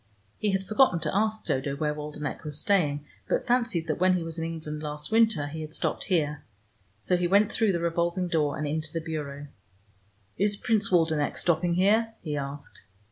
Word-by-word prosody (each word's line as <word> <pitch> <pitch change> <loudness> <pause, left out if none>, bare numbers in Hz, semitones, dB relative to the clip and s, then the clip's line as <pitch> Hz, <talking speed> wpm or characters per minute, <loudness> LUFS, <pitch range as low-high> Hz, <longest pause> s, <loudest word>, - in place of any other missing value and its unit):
He 210 - +1
had 190 0 0
forgotten 215 -4 +4
to - - -1
ask 220 +1 0
Dodo 140 +1 -1
where 150 +1 -1
Waldenech 150 0 -5
was 150 -1 -4
staying, 150 -9 +1 0.2
but - - +1
fancied 240 -9 +1
that - - -2
when 185 0 +4
he 170 - -3
was 165 0 -6
in - - -2
England 155 -2 -5
last 150 +2 -5
winter, 220 -9 +3
he 155 +2 -6
had 155 0 -7
stopped - - -2
here. 150 -6 0 0.6
So 180 +11 +1
he 175 0 +1
went 200 +3 +4
through 220 -3 +2
the 170 - 0
revolving 170 +2 0
door, 155 -4 0
and 150 - -2
into 155 +1 -2
the 165 - -2
Bureau. 145 -3 -5 0.9
"Is 205 +1 +1
Prince 215 -3 +1
Waldenech 160 -4 +2
stopping 170 0 +2
here?" 220 +5 +3
he 150 -3 -3
asked. 140 0 -6
165 Hz, 190 wpm, -27 LUFS, 150-195 Hz, 0.9 s, forgotten